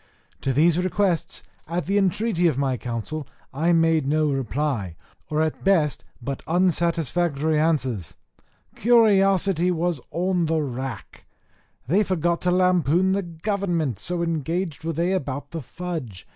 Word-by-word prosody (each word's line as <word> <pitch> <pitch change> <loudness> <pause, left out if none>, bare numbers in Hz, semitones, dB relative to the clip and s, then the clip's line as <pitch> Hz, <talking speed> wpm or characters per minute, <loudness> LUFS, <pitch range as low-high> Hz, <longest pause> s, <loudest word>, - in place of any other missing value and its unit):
To 135 - 0
these 160 +5 +3
requests, 185 -2 0 0.2
at 170 +2 -2
the 200 +2 +2
entreaty 195 -1 +1
of 155 - 0
my 135 -2 +1
council, 125 +5 -5 0.3
I 160 +6 +1
made 165 -3 +3
no 155 0 +2
reply, 130 - -2 0.3
or 155 +1 +1
at 160 - -3
best 170 -7 +2
but 135 +2 -5
unsatisfactory 170 -3 +1
answers. 130 - 0 0.6
Curiosity 195 -6 +4
was 175 -4 -1
on 180 -1 0
the 160 0 +1
rack; 130 -2 -6 0.6
they 185 +9 +3
forgot 175 -3 0
to 180 - +1
lampoon 180 -1 +3
the 200 +1 +1
government, 170 - -2
so 175 -1 -2
engaged 165 0 -2
were 165 0 -2
they 170 +4 0
about 145 -5 -3
the 165 - -4
fudge. 150 - -6
165 Hz, 135 wpm, -24 LUFS, 145-180 Hz, 0.6 s, Curiosity